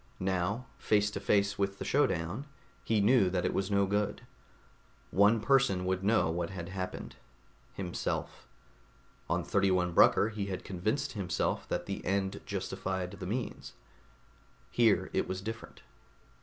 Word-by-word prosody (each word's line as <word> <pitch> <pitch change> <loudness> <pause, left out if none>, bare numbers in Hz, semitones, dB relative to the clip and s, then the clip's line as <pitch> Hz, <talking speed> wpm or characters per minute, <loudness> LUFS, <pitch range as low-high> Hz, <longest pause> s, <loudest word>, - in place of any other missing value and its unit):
Now, 95 +5 -1
face 105 0 +2
to 100 - -4
face 100 0 +1
with 100 0 0
the - - -5
showdown, 105 - 0 0.4
he 110 -2 +2
knew 105 -2 +5
that 90 -1 -1
it - - 0
was 95 0 -1
no 100 -1 +3
good. 105 +1 -1 0.9
One 105 +4 +5
person 125 -7 +3
would 95 0 -1
know 100 -5 +3
what 85 0 -2
had 85 -3 -6
happened: 95 -1 -5 0.6
himself. 90 -3 -4 0.8
On - - +1
31 95 -3 +2
Brucker, 100 - +5
he 105 -2 -4
had 95 -2 -4
convinced 105 +10 -1
himself 95 -6 -1
that - - -2
the - - -5
end 95 0 -1
justified 95 -1 -3
the - - -7
means; 115 +3 -4 1.0
here 115 -4 +3
it - - 0
was 95 - -3
different. 110 +3 -7
100 Hz, 140 wpm, -31 LUFS, 95-105 Hz, 1.0 s, knew